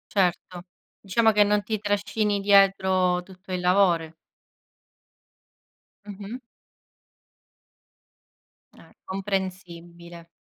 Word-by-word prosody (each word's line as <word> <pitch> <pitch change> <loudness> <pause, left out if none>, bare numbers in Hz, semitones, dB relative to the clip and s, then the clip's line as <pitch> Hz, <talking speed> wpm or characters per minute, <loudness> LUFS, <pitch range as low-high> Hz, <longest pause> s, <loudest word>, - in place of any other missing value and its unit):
Certo, 180 -1 -1 0.4
diciamo 220 +3 +2
che 210 -1 +4
non 205 0 +1
ti 215 +1 -3
trascini 205 0 -1
dietro 190 -2 +3
tutto 185 +1 -13
il 180 - -2
lavoro. 180 -3 +2 1.9
Mh-mh. 205 +5 -8 2.4
Eh, - - -19
comprensibile. 175 -3 -6
190 Hz, 75 wpm, -24 LUFS, 180-205 Hz, 2.4 s, che